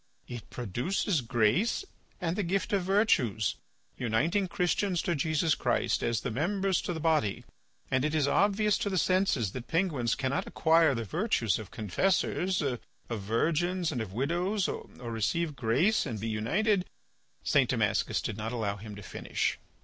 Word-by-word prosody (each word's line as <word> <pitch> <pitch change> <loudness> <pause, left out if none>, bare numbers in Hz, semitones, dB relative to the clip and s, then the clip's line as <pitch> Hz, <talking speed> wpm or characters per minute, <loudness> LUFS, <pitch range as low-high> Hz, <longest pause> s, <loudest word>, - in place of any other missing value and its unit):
It 120 -3 -8
produces 135 - -1
grace 120 - +1 0.3
and 170 -1 -1
the 210 - 0
gift 190 +1 -1
of 200 - +3
virtues, 165 - +2 0.4
uniting 155 - +1
Christians 180 0 0
to 175 - 0
Jesus 155 +1 +1
Christ, - - 0
as 115 -1 0
the 125 - -3
members 190 - 0
to 175 - -3
the 160 - -4
body, 155 -11 +1 0.5
and 130 0 +2
it 155 +1 0
is 150 -3 +2
obvious 205 +6 +2
to 205 - -1
the 190 - -1
senses 180 - +2
that 125 +2 -7
penguins 160 -9 +1
cannot 130 +1 -1
acquire 160 -3 +4
the 115 - -2
virtues 115 - 0
of 105 -3 -8
confessors, 180 - 0
of 130 -4 -1 0.3
virgins, 160 - 0
and 125 -6 -2
of 110 -4 -5
widows, 175 - 0
or - - -5 0.2
receive 150 +8 -1
grace 140 - +2
and 115 -5 -4
be 110 +2 -3
united 185 - +1
to—" - - -11 0.6
St. - - +3
Damascus - - +1
did 105 - -3
not 110 +1 -3
allow 105 -4 -2
him 105 0 -9
to 100 - -10
finish. - - -2
155 Hz, 165 wpm, -29 LUFS, 115-185 Hz, 0.6 s, acquire